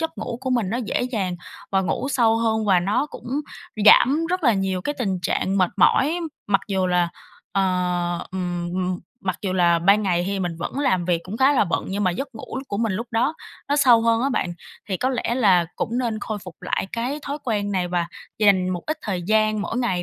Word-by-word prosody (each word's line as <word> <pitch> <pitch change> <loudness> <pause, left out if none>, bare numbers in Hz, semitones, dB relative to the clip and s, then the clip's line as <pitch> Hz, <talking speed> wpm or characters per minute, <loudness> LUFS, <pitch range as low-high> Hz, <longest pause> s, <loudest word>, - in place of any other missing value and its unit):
giấc 325 0 -1
ngủ 230 +1 -4
của 260 0 -3
mình 235 -7 +1
nó 230 - -1
dễ 240 -2 -1
dàng 210 -8 -2 0.4
và 195 - +3
ngủ 215 +8 -2
sâu 230 -5 +3
hơn 220 -1 +1
và 185 -3 +4
nó 205 +10 0
cũng - - -11 0.6
giảm 290 +9 +6
rất 365 +1 -1
là 235 - +6
nhiều 195 -2 -1
cái 290 - -2
tình 195 -6 -1
trạng 195 +3 0
mệt 185 -2 +3
mỏi. 315 +6 +3 0.3
Mặc 195 -1 +2
dù 190 -2 +1
là, 180 -1 +2 0.4
ờ, 195 - +2 0.7
ừm, 175 -2 -3
ừm, 185 -1 -1 0.3
mặc 185 -2 -1
dù 190 - -1
là 175 -2 +3
ban 200 +5 +4
ngày 175 -3 +1
thì 195 0 -2
mình 175 -3 -2
vẫn 215 +10 -4
làm 185 -11 +1
việc 175 -2 +1
cũng 195 +4 -6
khá 265 +3 +4
là 265 - +3
bận 175 - -1
nhưng 200 +1 -1
mà 185 - +3
giấc 275 +11 -4
ngủ 225 - -6
của 200 - -3
mình 225 -4 0
lúc 230 +5 -3
đó 240 +7 +1 0.3
nó 290 - +2
sâu 245 -5 +6
hơn 230 +1 +2
á 275 - +2
bạn. 180 -9 -1 0.4
Thì 190 - -1
có 255 - 0
lẽ 245 -2 -1
là 195 -8 +4
cũng 235 +2 -2
nên 230 -4 -1
khôi 215 0 -4
phục 180 -3 -11
lại - - -1
cái 250 +6 -2
thói 285 +2 -4
quen 205 -4 -1
này 180 -2 0
và 175 -1 0 0.3
dành 195 -3 +4
một 180 -2 -3
ít 310 +1 -2
thời 185 -4 -3
gian 215 +2 +2
mỗi 205 +4 -3
ngày 185 -8 0
205 Hz, 230 wpm, -23 LUFS, 185-240 Hz, 0.7 s, giảm